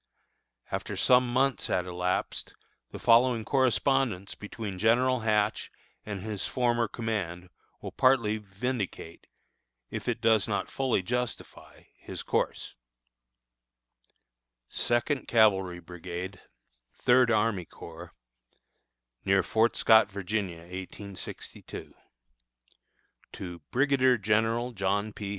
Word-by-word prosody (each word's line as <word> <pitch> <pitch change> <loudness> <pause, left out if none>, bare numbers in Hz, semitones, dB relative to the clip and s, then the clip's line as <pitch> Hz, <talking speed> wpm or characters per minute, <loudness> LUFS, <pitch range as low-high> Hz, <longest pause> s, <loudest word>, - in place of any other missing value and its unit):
After - - -3
some 125 -1 +4
months 135 +1 +1
had 90 - 0
elapsed, 90 0 -2 0.3
the - - -8
following 115 -1 +4
correspondence 130 -6 +1
between 105 -2 -7
General 125 +4 +3
Hatch 105 -1 0 0.4
and 100 -3 -5
his 105 -2 -3
former 120 -2 +1
command 95 -6 -4 0.3
will - - -5
partly 115 -5 +3
vindicate, 100 -4 -5 0.6
if - - -5
it 120 -1 0
does 110 -2 +3
not 105 -2 -2
fully 130 -8 0
justify, 125 +3 -5 0.2
his - - -7
course: - - -1 2.0
SECOND 120 +3 0
CAVALRY 95 -6 +3
BRIGADE, 90 +2 -7 0.5
THIRD 125 -1 +4
ARMY 110 -5 +1
CORPS, 85 +2 -11 1.1
Near 95 -1 +3
Fort 110 +6 +2
Scott, 110 0 +6
Va., 100 0 -5
1862. 95 0 -6 1.4
_To 90 -3 -7
Brigadier 130 -1 +3
General 115 +4 +1
John 100 0 -1
P. 100 -1 -6
110 Hz, 100 wpm, -28 LUFS, 95-120 Hz, 2.0 s, Scott